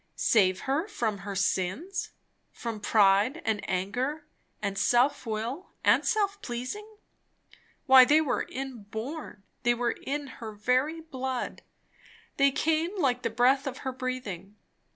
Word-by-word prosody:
Save 185 -4 +3
her 285 +8 -1
from 225 - -2
her 200 +1 -6
sins? 195 - -1 0.4
from 230 -2 -5
pride 210 +7 +3
and 220 -2 0
anger 245 - -2 0.3
and 200 -2 -2
self 240 +6 +2
will 230 - -3
and - - +5
self 405 -2 0
pleasing? 415 - -6 0.9
why, 265 -2 +9
they 295 +5 +5
were 310 -4 -1
inborn; 250 0 -6 0.2
they 240 -1 +3
were 240 0 0
in 285 +4 -4 0.2
her 220 -2 -6
very 255 +9 0
blood; 260 -5 -4 0.8
they 275 0 +5
came 320 +6 0
like 250 -6 +1
the 230 - -1
breath 255 +5 +3
of 265 -1 -5
her 260 - 0
breathing. 250 -7 -5
255 Hz, 130 wpm, -28 LUFS, 215-290 Hz, 0.9 s, why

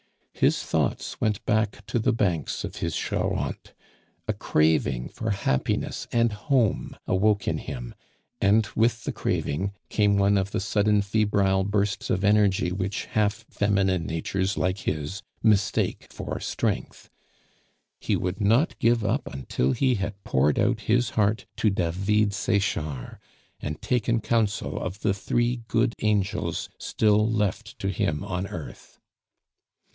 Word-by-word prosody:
His - - +2
thoughts - - -1
went 105 -2 0
back 105 -1 0
to 120 - -1
the 110 - +2
banks 90 -8 -1
of - - -6
his - - -2
Charente; - - -2 0.5
a - - +1
craving 75 -5 +1
for 110 - -4
happiness 95 -10 -1
and 115 -2 +2
home 115 -1 0
awoke 100 +1 +2
in - - 0
him; - - -6 0.5
and 105 +3 +4
with 115 0 +2
the - - -2
craving, 95 +7 -1 0.2
came 105 -2 +3
one 100 0 +4
of 95 0 -2
the - - -2
sudden 105 +1 +2
febrile 100 -2 +2
bursts 100 0 -1
of 95 - 0
energy 100 -3 +3
which 95 +1 -2
half 110 +1 0
feminine 95 -4 +1
natures 95 +4 -1
like 90 +2 0
his 75 +6 -3 0.2
mistake 105 -4 +2
for - - -5
strength. - - -3 0.9
He - - 0
would 90 +4 -2
not 115 +10 +3
give 115 -1 +3
up - - -1
until 65 -1 -1
he 130 -2 +2
had 100 -1 -4
poured 70 +3 +2
out 120 -2 +2
his 120 +1 +1
heart 105 0 +1
to 110 - +3
David 100 +3 +1
Sechard, 95 -10 -1 0.4
and 75 0 -4
taken 120 -1 +1
counsel 110 -2 0
of 95 +3 -5
the 105 - +2
three 120 +4 0
good 115 0 +2
angels 105 -3 0
still 105 0 +2
left 105 0 -1
to 95 - -2
him 75 -5 -1
on 95 +1 -3
earth. 80 -6 -9
100 Hz, 140 wpm, -26 LUFS, 95-110 Hz, 0.9 s, and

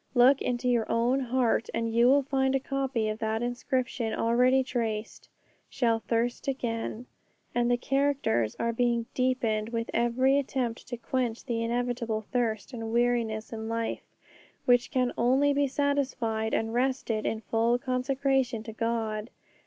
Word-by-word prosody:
Look 255 +3 +6
into 245 0 -1
your 240 -3 +1
own 240 +3 +2
heart 250 -3 +1
and 230 0 -1
you 235 +1 +5
will 280 +2 +5
find 265 0 +1
a - - +3
copy 265 -4 -1
of 215 0 -3
that 220 +1 -1
inscription 245 -1 -2
already 250 +3 +3
traced, 225 -4 -4 0.4
'Shall 230 -3 +1
thirst 235 +3 -1
again.' 235 -3 -3 0.5
And 240 0 +1
the 245 - +3
characters 270 - 0
are 230 0 -1
being 235 -1 +1
deepened 230 -4 0
with 230 -1 -3
every 255 +4 +3
attempt 250 -4 -3
to 245 - -5
quench 245 -2 -2
the 235 -3 -1
inevitable 235 -2 -2
thirst 230 -1 -1
and 225 -2 -5
weariness 235 -2 0
in 220 0 -5
life, 230 0 -2 0.6
which 245 0 +4
can 250 -1 0
only 265 +4 +3
be 285 0 +2
satisfied 255 -6 -1
and 225 0 -1
rested 245 -3 0
in 220 - -2
full 230 +2 +1
consecration 255 -1 0
to 225 -1 -8
God. 225 -1 -2
240 Hz, 150 wpm, -28 LUFS, 225-260 Hz, 0.6 s, Look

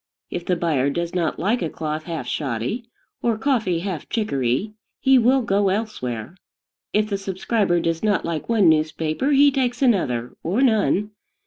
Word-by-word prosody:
If 175 - -5
the 180 - +2
buyer 155 -6 +1
does 170 +4 -3
not 170 -3 -1
like 215 +7 0
a 165 - -1
cloth 155 0 -4
half 165 -7 -4
shoddy, 135 - -3 0.4
or 230 -2 +1
coffee 220 -9 0
half 185 -5 -5
chicory, 195 - -1 0.3
he 265 -1 +5
will 255 +2 +3
go 200 -2 +2
elsewhere. 180 - -3 0.6
If 210 0 +2
the 200 -2 -2
subscriber 195 -1 0
does 165 -1 -1
not 210 -2 +1
like 165 +3 -4
one 220 -6 +4
newspaper, 155 - +1
he 285 0 +6
takes 250 -3 0
another, 125 - +1
or 200 +11 +1
none. 210 -3 +2
190 Hz, 160 wpm, -22 LUFS, 160-225 Hz, 0.6 s, he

